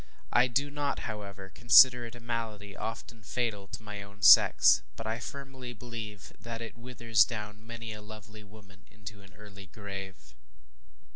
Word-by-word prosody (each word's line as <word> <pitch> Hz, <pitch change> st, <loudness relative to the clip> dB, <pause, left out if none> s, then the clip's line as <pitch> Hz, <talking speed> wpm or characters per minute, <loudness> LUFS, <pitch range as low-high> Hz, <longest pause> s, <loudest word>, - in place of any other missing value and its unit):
I 125 Hz, +1 st, +5 dB
do 140 Hz, +4 st, -1 dB
not, 145 Hz, -1 st, -2 dB
however, 100 Hz, -3 st, -7 dB
consider 120 Hz, 0 st, +6 dB
it 115 Hz, -, -12 dB
a -, -, -11 dB
malady 115 Hz, -4 st, -5 dB
often 115 Hz, 0 st, -7 dB
fatal 105 Hz, -3 st, -3 dB
to 110 Hz, -, -9 dB
my 105 Hz, -1 st, -7 dB
own 100 Hz, 0 st, -13 dB
sex; 70 Hz, -3 st, +7 dB
but -, -, -8 dB
I 110 Hz, +2 st, -3 dB
firmly 130 Hz, -1 st, -8 dB
believe 110 Hz, -4 st, -9 dB
that 115 Hz, +1 st, -7 dB
it 115 Hz, -1 st, -8 dB
withers 115 Hz, -3 st, +2 dB
down 105 Hz, -1 st, -7 dB
many 115 Hz, -1 st, -7 dB
a 105 Hz, -, -10 dB
lovely 110 Hz, 0 st, -12 dB
woman 100 Hz, -2 st, -18 dB
into 105 Hz, -1 st, -11 dB
an 95 Hz, -2 st, -18 dB
early 100 Hz, -1 st, -13 dB
grave. 95 Hz, -, -9 dB
110 Hz, 160 wpm, -29 LUFS, 100-115 Hz, -, sex